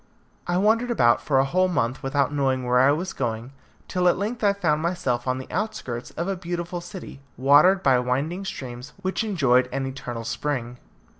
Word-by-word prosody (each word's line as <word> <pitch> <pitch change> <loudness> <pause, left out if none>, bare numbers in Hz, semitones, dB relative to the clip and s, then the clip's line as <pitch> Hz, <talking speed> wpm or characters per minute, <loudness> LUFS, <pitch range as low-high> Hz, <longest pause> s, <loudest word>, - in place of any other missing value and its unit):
I 175 0 +1
wandered 225 +5 +2
about 120 - +3
for 140 - +1
a 135 - +4
whole 185 +6 +2
month 125 -8 -1
without 140 +1 0
knowing 130 -3 0
where 125 0 +3
I 135 +2 +5
was 175 +6 -2
going, 120 0 -3 0.4
till 180 -1 +1
at 175 - +4
length 215 +4 -3
I 200 - +5
found 165 -7 0
myself 135 -8 -1
on 130 0 0
the 130 - -6
outskirts 155 - -3
of 170 +3 -2
a 195 - -1
beautiful 175 0 -4
city, 175 -5 -9 0.2
watered 145 +9 +5
by 130 -2 +4
winding 140 +10 -1
streams, 130 -6 -7
which 190 +4 -1
enjoyed 135 - +2
an 135 0 -2
eternal 125 -3 -6
spring. 120 0 -3
145 Hz, 190 wpm, -24 LUFS, 125-180 Hz, 0.4 s, I